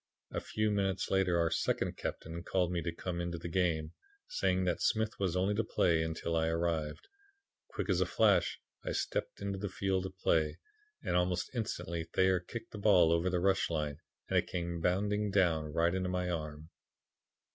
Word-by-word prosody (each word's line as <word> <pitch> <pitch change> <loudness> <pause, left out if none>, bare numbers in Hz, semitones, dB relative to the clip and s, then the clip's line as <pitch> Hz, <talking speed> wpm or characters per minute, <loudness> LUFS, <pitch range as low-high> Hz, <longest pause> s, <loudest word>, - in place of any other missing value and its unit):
A - - -2
few 110 0 0
minutes 95 -2 0
later 95 -2 +3
our 85 -1 +2
'second - - 0
captain' 85 +1 -5
called 90 0 0
to - - -2
me 85 - 0
to 85 - -2
come 85 +1 -4
into 85 0 -3
the 85 - -6
game, 85 -3 0 0.3
saying 95 - +1
that 90 -1 0
Smith 110 0 +1
was 95 -3 0
only 95 +3 +2
to 110 +2 +1
play 85 -6 +2
until 80 +1 -2
I 80 0 +2
arrived. 80 -2 -1 0.6
Quick - - -4
as - - +2
a - - +2
flash - - +3 0.2
I - - -2
stepped - - -2
into 100 -1 -2
the 105 0 -3
field 95 0 0
of 95 0 -14
play, 80 -4 +2 0.5
and - - 0
almost 90 0 +1
instantly 85 -8 -3
Thayer 95 +2 +3
kicked 115 +6 -8
the 105 - -7
ball 95 -5 +5
over 85 +2 +2
the 90 -1 +1
rush 95 +1 +2
line 75 -3 -2 0.3
and - - +3
it - - -3
came 85 -1 -3
bounding 105 +4 +1
down 85 -6 +2
right 85 +2 +2
into 95 -1 -1
my 90 -1 -1
arm. 75 -1 -5
90 Hz, 190 wpm, -33 LUFS, 85-95 Hz, 0.6 s, ball